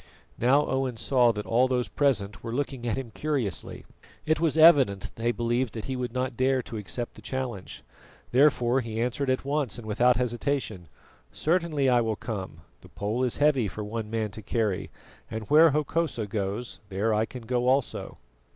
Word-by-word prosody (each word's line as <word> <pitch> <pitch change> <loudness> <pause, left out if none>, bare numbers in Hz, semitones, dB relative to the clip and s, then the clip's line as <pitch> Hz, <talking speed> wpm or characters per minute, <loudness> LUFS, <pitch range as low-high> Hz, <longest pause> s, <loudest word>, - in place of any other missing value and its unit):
Now 135 +5 +4
Owen 130 -3 -1
saw 125 -1 +3
that 105 -2 -5
all 125 +3 +3
those 125 -1 0
present 105 -9 0
were 115 - -4
looking 135 -3 -3
at 115 - -1
him 130 -4 -5
curiously. 125 - -3 0.4
It 155 0 +2
was 160 -1 +1
evident 140 - +5
they 115 +1 0
believed 120 +1 -1
that 110 - -5
he 130 - -3
would 125 -1 -3
not 130 0 -2
dare 130 +1 +1
to 115 - -7
accept 115 +4 -4
the - - -14
challenge. 120 -4 -5 0.5
Therefore 130 -2 +3
he 110 -1 -5
answered 125 +4 -1
at 130 +1 0
once 140 -5 -1
and 120 - -9
without 120 +4 +3
hesitation: 120 - -2 0.4
"Certainly 160 -4 0
I 125 -2 +4
will 110 -1 -1
come; 100 -8 -6 0.2
the - - -16
pole 110 +5 -2
is 125 - 0
heavy 145 -6 +3
for 105 +2 -6
one 110 +1 -5
man 110 -2 -2
to 110 - -8
carry, 105 -4 -1 0.4
and 110 -1 -5
where 160 +2 +8
Hokosa 150 -4 -1
goes, 105 +3 -4
there 105 +3 0
I 110 +1 +1
can 125 0 -9
go 125 +1 0
also." 130 -1 0
120 Hz, 180 wpm, -27 LUFS, 110-135 Hz, 0.5 s, where